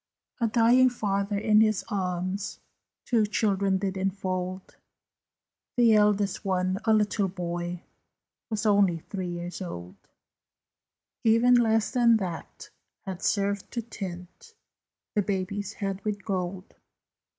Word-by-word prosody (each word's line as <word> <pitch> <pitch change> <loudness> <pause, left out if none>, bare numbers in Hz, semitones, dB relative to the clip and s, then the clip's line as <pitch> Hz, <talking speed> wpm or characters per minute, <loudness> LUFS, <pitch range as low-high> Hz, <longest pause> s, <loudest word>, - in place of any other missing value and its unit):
A 230 - +2
dying 240 +3 +5
father 200 -3 -1
in 215 +1 +4
his 215 -2 +2
arms 185 0 -2 0.5
Two 225 -4 +2
children 200 -2 +1
did 190 0 -2
enfold. 185 -1 -3 1.0
The 235 -2 +6
eldest 210 -2 +2
one, 185 -1 0
a 225 - +3
little 210 -2 +2
boy, 175 -1 -4 0.7
Was 215 -1 -2
only 200 -5 +4
three 185 +3 -5
years 175 +1 -5
old; 90 - -7 1.3
Even 230 +2 +5
less 225 -2 +3
than 235 -2 +5
that 180 -6 -6 0.3
had 190 -2 -6
served 200 -1 0
to 235 - -2
tint 190 - -8 0.6
The 210 - +2
baby's 200 +1 -3
head 195 -1 -4
with 205 -2 -3
gold. 185 -1 -3
200 Hz, 115 wpm, -27 LUFS, 185-215 Hz, 1.3 s, The